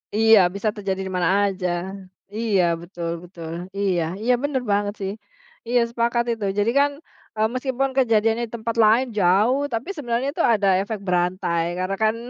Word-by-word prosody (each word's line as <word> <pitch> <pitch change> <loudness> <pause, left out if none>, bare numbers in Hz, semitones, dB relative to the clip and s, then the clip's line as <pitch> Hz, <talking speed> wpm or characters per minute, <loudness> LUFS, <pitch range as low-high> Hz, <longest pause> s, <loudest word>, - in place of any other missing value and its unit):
Iya 220 -1 +6 0.2
bisa 205 +2 0
terjadi 195 -2 -3
di - - -6
mana 175 -2 +2
aja. 190 -2 -1 0.7
Iya 215 -5 +2 0.2
betul 170 -1 -6
betul 170 -2 -9 0.3
iya 190 -4 +1 0.2
iya 250 +2 +3
bener 285 -3 0
banget 205 0 +1
sih, 195 - -2 0.6
iya 245 +1 +3
sepakat 235 0 0
itu 225 -3 -3
jadi 215 +3 +2
kan, 285 0 +3 0.4
eee, 215 0 +2
meskipun 260 +1 -1
kejadiannya 225 -2 +2
di 225 - -22
tempat 230 0 -3
lain 230 +5 +4
jauh 205 +9 +3
tapi 230 +10 -3
sebenarnya 250 -2 -2
itu 335 - -1
ada 205 -2 +1
efek 215 +1 -4
berantai 175 -1 0 0.2
karena 185 +2 -1
kan 220 +1 +3
215 Hz, 165 wpm, -22 LUFS, 190-235 Hz, 0.7 s, Iya